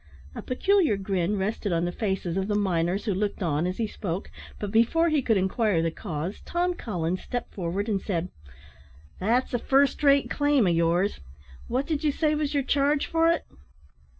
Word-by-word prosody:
A - - -6
peculiar 330 - +2
grin 195 0 -1
rested 200 +1 -2
on 170 0 +1
the 175 - -1
faces 190 -4 -2
of 195 0 -1
the 210 - 0
miners 190 0 0
who 210 - +1
looked 205 +1 -2
on 160 0 0
as 185 - -3
he 230 - 0
spoke, 195 -3 -5 0.3
but 205 -2 -4
before 235 +10 +3
he 305 -3 +2
could 225 -4 +2
inquire 190 -2 +1
the 165 - 0
cause, 170 0 -5
Tom 355 +1 0
Collins 185 - -3
stepped 245 -1 -5
forward, 190 +3 -3
and 200 -3 0
said: 180 -3 -2 0.9
"That's 240 +7 +1
a 245 - +1
first 275 +4 +2
rate 280 -1 +4
claim 290 -5 +2
of 175 - +3
yours. 170 +4 +1 0.5
What 255 +4 -1
did 310 -1 -2
ye 305 - +3
say 305 +1 +1
was 300 -1 -1
your 280 - +2
charge 280 +2 +2
for 330 0 +2
it?" 335 - -1
210 Hz, 190 wpm, -26 LUFS, 185-280 Hz, 0.9 s, rate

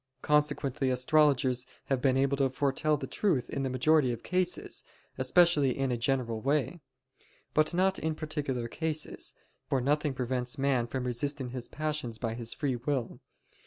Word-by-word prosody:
Consequently 145 -3 +1
astrologers 130 -1 +3 0.2
are 135 -2 0
able 135 +1 +2
to 135 -1 +2
foretell 145 +3 +1
the - - -5
truth 170 - 0
in 140 - -2
the 135 - -1
majority 130 +1 +3
of 120 -1 -6
cases, 180 -1 -1 0.4
especially 170 -7 +4
in 135 -1 0
a - - +1
general 120 -2 -1
way. 145 +6 0 0.7
But 155 0 +3
not 190 +1 +2
in 160 0 -1
particular 145 -6 -3
cases; 155 +3 -2 0.3
for 135 - +2
nothing 145 +2 +1
prevents 125 0 -2
man 135 -3 +1
resisting 130 +1 -2
his 125 -1 -6
passions 150 -7 -3
by 115 -1 -2
his 115 0 -5
free 140 -6 -1
will. 125 -1 -2
135 Hz, 150 wpm, -30 LUFS, 125-150 Hz, 0.7 s, especially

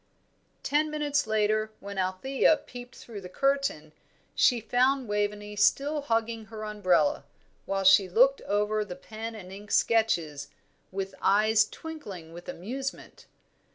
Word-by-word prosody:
Ten 300 +2 +1
minutes 290 -3 0
later, 215 0 +1
when 200 0 -6
Althea 260 +12 +2
peeped 245 -2 -11
through 215 -4 -9
the 180 - -9
curtain, 275 - 0 0.4
she 245 -3 +4
found 250 +3 +1
Waveney 210 0 -2
still 285 +8 +2
hugging 225 -3 -1
her 220 0 -8
umbrella, 210 - +1 0.4
while 195 0 -1
she 190 0 +6
looked 260 +8 +4
over 210 +1 +1
the 180 -4 -8
pen 220 +4 -7
and 185 -4 -10
ink 200 +2 -10
sketches 165 -11 +1 0.4
with 195 0 -4
eyes 215 +2 +4
twinkling 200 - -9
with 175 +1 -10
amusement. 265 +9 -6
215 Hz, 130 wpm, -28 LUFS, 195-255 Hz, 0.4 s, she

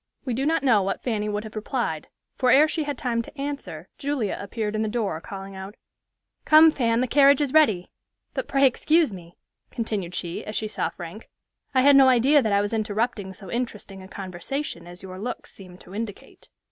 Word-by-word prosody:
We 255 - -1
do 270 +5 -1
not 325 -1 +1
know 230 -7 +4
what 195 +1 -3
Fanny 210 -4 -1
would 210 0 -2
have 220 0 -10
replied; 215 - -3 0.3
for 255 - +1
ere 285 +5 +7
she 315 0 -2
had 290 -2 -3
time 235 -2 -1
to 265 - -13
answer 275 - -5
Julia 275 -8 -1
appeared 210 +1 -3
in 215 - 0
the 220 - 0
door, 210 -8 -2
calling 195 +1 -8
out, 190 +2 -8 0.7
"Come, 315 +1 +7
Fan, 235 -4 +1
the 255 - +1
carriage 280 +1 +5
is 285 -3 -1
ready. 220 - +3 0.4
But, - - -3
pray 275 0 +3
excuse 305 +1 +3
me," 175 -2 -12 0.3
continued 205 -6 -3
she, 170 -1 -4
as 215 - -7
she 215 - -1
saw - - -2
Frank, 175 +5 -10 0.5
"I 260 - +5
had 285 0 +7
no 270 -1 +8
idea 265 +4 +5
that 220 -4 -1
I 200 0 +3
was 205 +2 -2
interrupting 215 -1 -1
so 190 0 -11
interesting 215 -5 -4
a 190 - -11
conversation 190 - -5
as 175 +1 -11
your 185 -1 -8
looks 245 +5 -6
seem 185 -2 -13
to 185 - -14
indicate." 210 -1 -7
220 Hz, 205 wpm, -25 LUFS, 195-265 Hz, 0.7 s, no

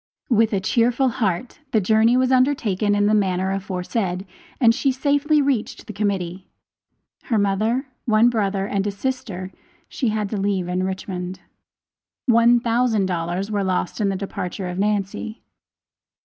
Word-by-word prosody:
With 225 -1 +4
a 200 - +1
cheerful 240 +6 +2
heart 230 +1 -2
the 220 - +5
journey 220 +4 +3
was 255 0 +2
undertaken 230 -7 +2
in 205 0 +2
the 210 - +3
manner 190 -2 +1
aforesaid, 190 0 -2 0.3
and 230 -3 +5
she 270 +2 +1
safely 285 +3 +2
reached 270 -6 -1
the 215 - -8
Committee. 190 -3 -2 0.8
Her 230 - +1
mother, 215 +6 +1 0.2
one 220 0 +4
brother 200 -4 0
and 200 0 -1
a - - 0
sister 200 -5 -4 0.4
she 255 - -2
had 215 -1 -1
to 215 - -1
leave 195 -2 0
in 180 +1 -1
Richmond. 185 -1 -4 0.8
One 235 0 +5
thousand 230 -3 +1
dollars 180 +3 -2
were 205 -1 0
lost 185 +2 -1
in 200 - +2
the 195 - -1
departure 190 -1 -4
of 180 +1 -4
Nancy. 210 +2 -2
205 Hz, 150 wpm, -22 LUFS, 190-235 Hz, 0.8 s, the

